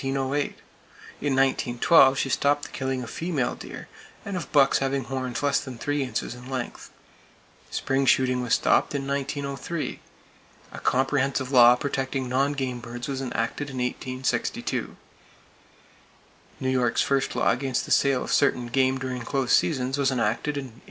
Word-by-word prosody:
In 135 0 -1
1912 135 0 +1
she 135 - 0
stopped 145 +2 +2
the - - -6
killing 130 -1 -3
of 115 - -8
female 160 -7 -1
deer, - - -9 0.4
and 200 - -4
of 175 - -5
bucks 140 -2 +4
having 135 0 -1
horns 130 0 -4
less 140 -1 +3
than 130 -3 -8
three 145 +3 -1
inches 130 -2 -3
in 125 +1 -11
length. 130 -2 -5 0.8
Spring 135 0 0
shooting 125 -1 +3
was 125 - +2
stopped - - +2
in 135 -1 -2
1903. 140 +3 -3 0.7
A - - -8
comprehensive 135 0 0
law 120 -2 +8
protecting 135 0 -2
non 135 +3 +1
game 130 -3 -3
birds 120 +1 -7
was 135 -1 -3
enacted 135 +3 -3
in 130 - -7
1862. 130 +1 -2 1.6
New 130 - -1
York's 125 -2 +2
first 135 -1 0
law - - +3
against 130 +1 -1
the - - -8
sale 140 -2 +3
of - - -3
certain 125 -4 +2
game 130 +1 +2
during 130 -1 -4
close 130 +1 0
seasons 135 -2 +1
was 135 -2 +3
enacted 130 +4 -1
in 140 - -2
1837. 120 - -19
135 Hz, 155 wpm, -25 LUFS, 125-140 Hz, 1.6 s, law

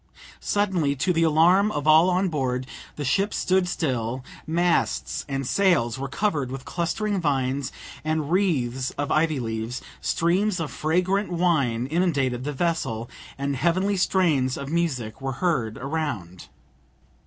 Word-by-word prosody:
Suddenly, 185 -9 +1
to 145 +7 +1
the 165 - +1
alarm 170 +6 +4
of 145 -5 -3
all 160 +3 +6
on 185 +2 +2
board, 130 -6 -1 0.3
the 145 - -4
ship 195 +10 +1
stood 185 -1 +2
still, 130 -7 -2 0.2
masts 170 +2 0
and 135 -1 -2
sails 135 -8 +2
were 135 - -3
covered 145 -4 -1
with 130 0 -7
clustering 195 +3 -1
vines 135 -3 0 0.3
and 155 -1 -1
wreaths 135 -10 +1
of 145 0 -2
ivy 155 -2 +2
leaves, 115 +1 -3 0.2
streams 180 +3 +1
of 160 -3 -3
fragrant 180 +5 0
wine 145 -10 +1
inundated 135 -6 0
the 150 - -1
vessel, 135 -8 -2 0.3
and 140 0 -1
heavenly 185 +8 +1
strains 160 -9 +2
of 140 0 -6
music 135 -9 -1
were 135 0 -2
heard 125 -8 -1
around. 130 - -4
155 Hz, 140 wpm, -25 LUFS, 130-180 Hz, 0.3 s, all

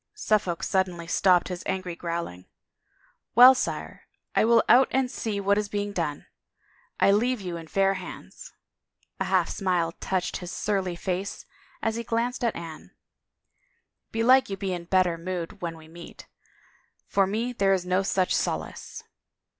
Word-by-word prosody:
Suffolk 210 - 0
suddenly 180 -3 0
stopped 180 +1 +3
his 180 -1 -5
angry 185 -2 -3
growling. 170 - -5 0.4
" - - -38
Well, 250 +2 +10
sire, 255 - -4 0.3
I - - +4
will 235 0 +5
out 255 +2 +6
and 260 -1 0
see 215 -6 -3
what 200 +1 +2
is 210 -1 -3
being 205 0 -2
done. 155 -6 -3 0.7
I - - +5
leave 240 +4 +2
you 180 -3 -5
in 165 -1 -8
fair 195 +3 +2
hands," 195 - -9 0.4
— - - -43
a - - +1
half - - +2
smile 180 -4 0
touched 185 +1 -2
his 180 -1 -7
surly 190 -4 -1
face 185 +2 -4 0.4
as 225 0 0
he 235 - -3
glanced 235 +2 -2
at 235 - +1
Anne 165 -2 -8 1.2
•^" - - -52
belike 250 +3 +4
you 195 - -4
be 190 -1 -2
in 175 -1 -5
better 180 -2 +2
mood 175 -1 -5
when 165 -2 -4
we 160 -1 -14
meet. 170 +1 -12 0.8
For 195 -1 +2
me 230 +5 -2
there 195 -4 +2
is 185 -2 -1
no 185 +1 +2
such 190 -1 +1
solace." - - -3
190 Hz, 165 wpm, -26 LUFS, 175-215 Hz, 1.2 s, Well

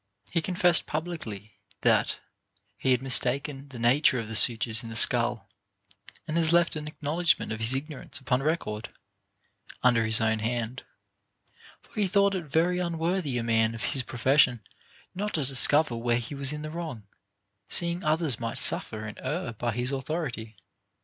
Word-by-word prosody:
He 170 - 0
confessed 180 0 +2
publicly, 135 - -6 0.2
that - - +2 0.6
he 130 - -2
had 125 0 +2
mistaken 135 +2 -1
the 130 - -10
nature 125 +3 +3
of 115 - -5
the - - -5
sutures 115 0 +4
in 115 - -9
the 115 - -7
skull, 120 -3 +3 0.8
and 155 +1 -2
has 165 -1 +4
left 170 -1 +3
an 150 -1 -5
acknowledgment 155 +1 -1
of 110 - -4
his 110 +4 +3
ignorance 140 -1 -6
upon 130 -1 0
record, 135 -8 -2 0.9
under 120 -2 +4
his 110 0 +4
own 110 0 +1
hand; 120 +2 -3 1.0
for - - -25
he 200 - +2
thought 200 +1 +2
it 185 -4 -4
very 170 +5 +1
un 170 -2 -3
worthy 165 -5 -1
a 115 - -2
man 115 0 +1
of 110 - -7
his 135 - +2
profession 125 0 +2 0.5
not 205 +3 -3
to 150 -4 0
discover 140 +1 +4
where 120 0 0
he 120 +4 -6
was 140 -1 0
in 150 0 -6
the 155 - -6
wrong, 160 -10 -6 0.7
seeing 170 +1 0
others 155 -5 +1
might 115 -1 -4
suffer 110 -1 +3
and 105 - -8
err 140 -1 -3
by 120 +2 -3
his 125 +4 -2
authority. 135 -6 -4
135 Hz, 170 wpm, -27 LUFS, 115-160 Hz, 1.0 s, sutures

